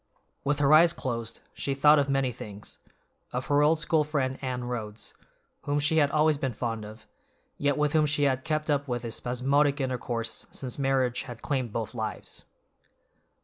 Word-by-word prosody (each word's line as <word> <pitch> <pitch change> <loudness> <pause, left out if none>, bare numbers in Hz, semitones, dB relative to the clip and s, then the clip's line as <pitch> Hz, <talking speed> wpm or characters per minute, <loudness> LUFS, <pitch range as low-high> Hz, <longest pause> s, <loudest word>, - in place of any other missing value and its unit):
With 145 0 +1
her 145 0 +4
eyes 165 +2 +7
closed, 115 -7 -4
she 140 - -2
thought 150 +2 +6
of 140 -1 0
many 135 -2 +1
things; 105 -3 -10 0.5
of 125 +1 -3
her 145 0 +3
old 155 +2 +4
school 160 -1 +2
friend 140 -3 -1
Anne 125 -2 -3
Rhodes, 115 -3 -5 0.5
whom 145 0 0
she 150 +2 +2
had 145 -2 +4
always 150 0 +2
been 135 -3 -1
fond 115 -1 -3
of, 110 +1 -12 0.5
yet 145 0 +1
with 150 -1 +1
whom 155 -1 +4
she 145 0 +1
had 130 -2 +1
kept 155 -1 -1
up 145 0 0
but 120 -1 -2
a 115 - -4
spasmodic 140 +5 +1
intercourse 125 -3 -3
since 130 0 -6
marriage 130 -3 +1
had 120 -2 -9
claimed 130 -5 -1
both 110 +1 -4
lives. 110 -2 -6
135 Hz, 180 wpm, -28 LUFS, 120-145 Hz, 0.5 s, eyes